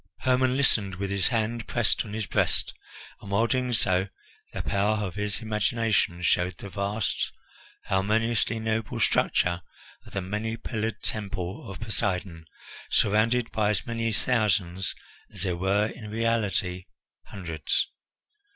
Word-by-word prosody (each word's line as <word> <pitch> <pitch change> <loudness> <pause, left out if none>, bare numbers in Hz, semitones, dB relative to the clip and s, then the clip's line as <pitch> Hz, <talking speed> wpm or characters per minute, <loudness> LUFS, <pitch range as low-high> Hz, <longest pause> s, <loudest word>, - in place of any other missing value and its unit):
Hermon 130 0 +3
listened 105 -8 +2
with 100 +1 -3
his 100 -1 +1
hand 115 0 -1
pressed 120 -4 +3
on 105 - -8
his 110 -1 -2
breast, - - +2 0.5
and 100 - -9
while 100 +3 +3
doing 125 +1 0
so 95 -4 +2 0.4
the - - -4
power 100 +2 +2
of 100 -4 -3
his 105 +1 -2
imagination 110 -5 +1
showed 90 +1 +2
the 100 - -8
vast, 100 +2 -1 0.5
harmoniously 110 +4 +1
noble 110 -1 -1
structure 90 0 +2 0.5
of - - -14
the 95 - -1
many 105 +4 -3
pillared 115 -1 -3
Temple 95 -4 -3
of 95 - -7
Poseidon, 95 -7 -2 0.4
surrounded 115 +3 +3
by 105 -2 +2
as 105 - 0
many 115 -1 -1
thousands 100 -6 +1 0.3
as - - -4
there 90 -3 0
were 100 +4 +2
in 110 -3 -9
reality 105 -5 0 0.4
hundreds. 85 -6 -1
105 Hz, 135 wpm, -27 LUFS, 95-115 Hz, 0.5 s, Hermon